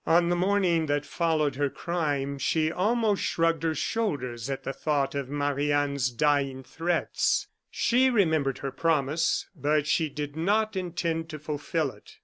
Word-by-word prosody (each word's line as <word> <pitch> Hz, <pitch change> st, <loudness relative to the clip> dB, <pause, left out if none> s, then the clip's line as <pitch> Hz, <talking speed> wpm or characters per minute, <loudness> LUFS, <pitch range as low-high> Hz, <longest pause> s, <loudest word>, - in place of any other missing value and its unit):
On 170 Hz, +1 st, +4 dB
the 175 Hz, -, +2 dB
morning 180 Hz, -3 st, +2 dB
that 145 Hz, 0 st, 0 dB
followed 155 Hz, -5 st, 0 dB
her 145 Hz, -1 st, +1 dB
crime, 145 Hz, -5 st, -2 dB
she 155 Hz, +3 st, +1 dB
almost 210 Hz, +3 st, +1 dB
shrugged 165 Hz, -2 st, +1 dB
her 160 Hz, -1 st, 0 dB
shoulders 130 Hz, -, -2 dB
at 135 Hz, -, -3 dB
the 135 Hz, -, -3 dB
thought 140 Hz, -3 st, 0 dB
of 140 Hz, -2 st, -3 dB
Marie 145 Hz, 0 st, 0 dB
Anne's 140 Hz, -3 st, +1 dB
dying 135 Hz, 0 st, +1 dB
threats. 170 Hz, +6 st, 0 dB, 0.2 s
She 255 Hz, +2 st, +3 dB
remembered 160 Hz, -, +2 dB
her 135 Hz, -, -4 dB
promise, 160 Hz, 0 st, +1 dB
but 150 Hz, 0 st, +1 dB
she 155 Hz, +1 st, +1 dB
did 145 Hz, 0 st, -5 dB
not 210 Hz, +6 st, +1 dB
intend 170 Hz, -3 st, -2 dB
to 155 Hz, -, -6 dB
fulfil 150 Hz, 0 st, -2 dB
it. -, -, -17 dB
155 Hz, 155 wpm, -27 LUFS, 140-170 Hz, 0.2 s, On